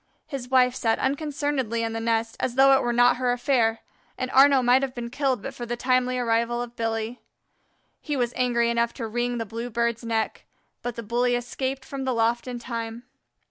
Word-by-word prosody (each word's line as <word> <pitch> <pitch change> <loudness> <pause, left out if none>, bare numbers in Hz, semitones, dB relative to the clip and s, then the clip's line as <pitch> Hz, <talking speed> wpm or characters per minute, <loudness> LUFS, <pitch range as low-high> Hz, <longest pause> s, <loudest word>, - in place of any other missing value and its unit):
His 265 -4 -6
wife 250 -1 +4
sat 230 -3 +1
unconcernedly 275 -4 -1
in 225 0 -2
the 225 - -2
nest, 225 0 0
as 245 - -2
though 270 +1 +6
it 265 - +4
were 240 - 0
not 245 +1 +4
her 250 -1 +1
affair, 240 -3 +1 0.4
and 255 0 -3
Arnaux 270 -1 +6
might 250 +2 +5
have 270 -2 -3
been 235 -1 -5
killed 265 -5 0
but - - -5
for 240 - -7
the 240 +1 -3
timely 255 0 +1
arrival 235 0 +1
of 240 0 -5
Billy. 225 +1 -3 0.8
He 295 -2 -3
was 245 -1 0
angry 235 -2 +2
enough 235 0 0
to 235 - -4
wring 240 +2 -1
the 225 - -3
Blue 230 +3 -5
bird's 235 0 -1
neck, 225 -1 -2 0.3
but 245 -1 -4
the 230 - -6
bully 245 +3 +1
escaped 260 +2 -3
from 275 -1 -5
the 260 -2 -1
loft 230 +2 +1
in 250 -1 -4
time. 230 -1 -5
240 Hz, 205 wpm, -25 LUFS, 230-255 Hz, 0.8 s, though